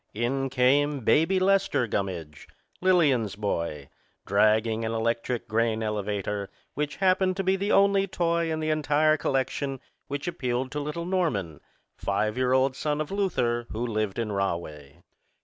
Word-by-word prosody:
In 135 +4 -1
came 135 +2 +2
Baby 165 - +3
Lester 195 -9 +2
Gummidge, 90 - -4 0.3
Lillian's 145 - +3
boy, 85 -8 -3 0.4
dragging 110 +2 +2
an 110 0 -2
electric 115 +1 -1
grain 110 0 0
elevator 105 -1 -2 0.2
which 145 0 -2
happened 185 -1 +2
to 195 - -1
be 190 +1 +2
the 200 +2 -1
only 195 0 +4
toy 170 -3 0
in 160 0 -2
the 155 0 0
entire 155 0 +3
collection 135 -1 -1 0.3
which 145 +3 -4
appealed 130 -5 -2
to 150 - -3
little 150 +3 -4
Norman, 120 - -1 0.4
five 105 +2 -1
year 130 0 +1
old 130 0 +3
son 150 +1 -1
of 155 +2 -3
Luther, 120 -13 0
who 115 +3 -3
lived 110 -4 -2
in 115 -2 -2
Rahway. 85 -6 -4
130 Hz, 150 wpm, -26 LUFS, 105-155 Hz, 0.4 s, only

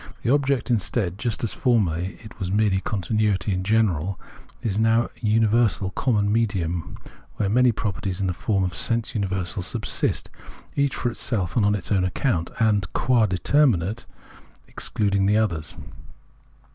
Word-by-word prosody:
The 120 - +1
object, 140 -3 +1
instead, 100 -3 -1
just 115 0 -2
as 115 - 0
formerly 95 - 0
it 110 +1 -13
was 95 -2 -3
merely 100 -2 +2
continuity 105 0 0
in 90 0 -2
general, 100 -4 +1 0.4
is 105 -2 0
now 115 +1 +3
a - - -8
universal 110 -3 +2
common 105 -1 +1
medium 90 -9 -1 0.4
where 100 - -1
many 125 +3 +4
properties 100 -3 -3
in 100 - 0
the 90 - 0
form 95 +2 0
of 90 -2 -2
sense 115 +5 0
universals 95 -3 -1
subsist, - - -1 0.4
each 140 -1 +1
for 120 - -1
itself 95 - -1
and 115 - +3
on 105 0 +3
its 100 - -5
own 95 -3 +3
account, 90 - -1
and, 105 -3 +2
qua 120 -4 +3
determinate, 110 - +1 0.6
excluding 100 -2 0
the 105 +1 +3
others. 85 -8 -1
105 Hz, 150 wpm, -24 LUFS, 95-115 Hz, 0.6 s, many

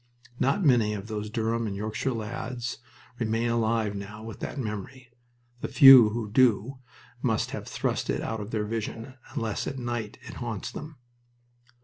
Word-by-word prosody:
Not 140 +8 +2
many 115 -6 +4
of 100 -1 -6
those 105 -1 -4
Durham 115 +1 -1
and 100 - -4
Yorkshire 110 +6 -2
lads 120 +1 -4 0.4
remain 115 0 0
alive 110 -2 +1
now 105 +2 -7
with 110 -2 -8
that - - -5
memory. 120 +2 -6 0.5
The - - -3
few 135 -5 +9
who 110 -1 -4
do 125 +2 +3 0.4
must - - 0
have - - -6
thrust - - -2
it - - 0
out 110 - -3
of 105 - -6
their 110 -2 -1
vision, 115 +3 -4 0.2
unless 110 -3 -2
at 135 - -4
night 120 -4 -4
it - - -9
haunts 115 -4 -4
them. 150 0 -8
115 Hz, 160 wpm, -27 LUFS, 105-125 Hz, 0.5 s, few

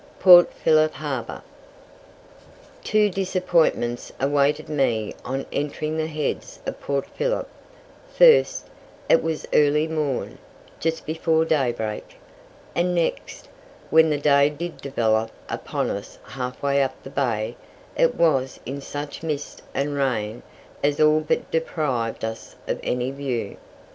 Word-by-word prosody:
PORT 180 -2 +8
PHILLIP 155 -1 +3
HARBOUR. 135 -6 -5 1.4
Two 215 -1 +3
disappointments 175 -10 0
awaited 140 +2 +1
me 120 -8 0
on 135 +2 -3
entering 150 +2 -2
the 160 0 -1
Heads 150 -2 -4
of - - -5
Port 140 -1 -1
Phillip: - - -2 0.6
first, 485 -2 +5 0.4
it - - +5
was 160 -1 -3
early 150 +1 +4
morn, 150 -5 -2 0.4
just 165 0 -2
before 160 0 +1
daybreak, 120 -8 -1 0.6
and 180 +1 +1
next, 170 -1 -2 0.4
when 160 0 +6
the 150 - +1
day 145 0 +4
did 170 +4 -6
develop 115 -5 0 0.2
upon - - -3
us 100 +1 -7
half 125 -1 -6
way 140 0 +2
up 135 - -1
the 135 - -9
Bay, 115 -5 -1 0.4
it - - +3
was 135 -6 +1
in 140 +3 -5
such 145 +1 -6
mist 150 -3 -4
and 140 +2 -1
rain 120 -5 -1 0.4
as 145 0 +1
all 155 0 +5
but 155 - -2
deprived 140 -9 -1
us 110 0 -7
of - - -2
any 125 +1 -1
view. 135 -4 -3
145 Hz, 130 wpm, -23 LUFS, 130-160 Hz, 1.4 s, PORT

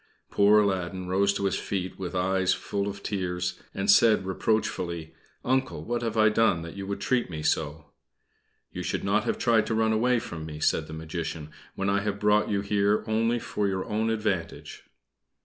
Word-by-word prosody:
Poor 105 +1 +5
Aladdin 95 -2 -1
rose 100 +2 +2
to 100 0 -2
his 95 - 0
feet 95 -2 -4
with 95 -1 -5
eyes 95 0 +2
full 100 0 -3
of 100 0 -6
tears, 90 -3 -3
and 100 0 -3
said, 110 -2 +5
reproachfully 90 -4 -1 0.3
"Uncle, 130 +1 0
what 120 0 -2
have 115 -1 -2
I 110 0 +6
done 105 -6 +2
that 85 +2 -8
you 100 -1 -6
should 100 - -3
treat 125 -5 0
me 80 -3 -5
so?" 75 -1 -1 0.8
"You - - -5
should - - -2
not 105 +3 +1
have - - 0
tried 115 -3 +2
to 110 - 0
run 110 0 +2
away 125 +3 +2
from 85 -9 -5
me," 75 -1 -7
said 75 0 +1
the 80 - -8
Magician, 80 -1 -5 0.2
"when 95 - -2
I 100 0 +2
have 100 -1 -3
brought 105 0 +3
you 100 -2 0
here 100 +1 +1
only 115 +2 +1
for 115 -4 -2
your 95 -1 -2
own 110 +1 -1
advantage. 105 -6 -3
100 Hz, 190 wpm, -27 LUFS, 90-110 Hz, 0.8 s, I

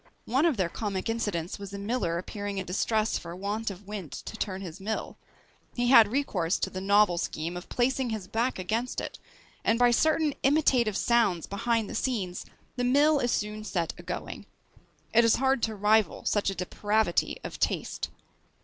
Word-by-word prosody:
One 270 +8 +3
of 300 -8 +1
their 185 -3 +1
comic 195 +2 -3
incidents 205 -7 -2
was 200 -1 -8
a - - -4
miller 200 -5 -1
appearing 200 +2 -5
in 190 - -2
distress 215 +4 0
for 170 0 -8
want 205 +4 -2
of 195 0 -9
wind 195 -6 -6
to - - -7
turn 195 -3 -3
his 175 -1 -8
mill; 215 +3 -3 0.6
he 245 0 +1
had 230 -4 +8
recourse 200 -10 0
to - - -1
the 185 - -5
novel 200 -2 +4
scheme 165 +2 -3
of 180 - -8
placing 255 +1 +1
his 215 -4 -4
back 235 +6 0
against 220 +7 -2
it, - - -6 0.4
and 225 - +3
by 245 0 +5
certain 310 +3 +2
imitative 260 -7 +3
sounds 220 -9 +2
behind 225 +2 0
the - - -7
scenes 195 -9 -2 0.3
the 245 - 0
mill 285 +4 +4
is 245 -2 0
soon 210 0 -2
set 175 -5 -2
a - - -7
going. - - -6 0.7
It 235 +1 +6
is 230 - +5
hard 265 -1 +2
to 220 -1 -1
rival 210 +1 +2
such 205 -2 +1
a 195 - -3
depravity 205 +1 0
of - - -7
taste. - - -1
215 Hz, 185 wpm, -28 LUFS, 190-240 Hz, 0.7 s, had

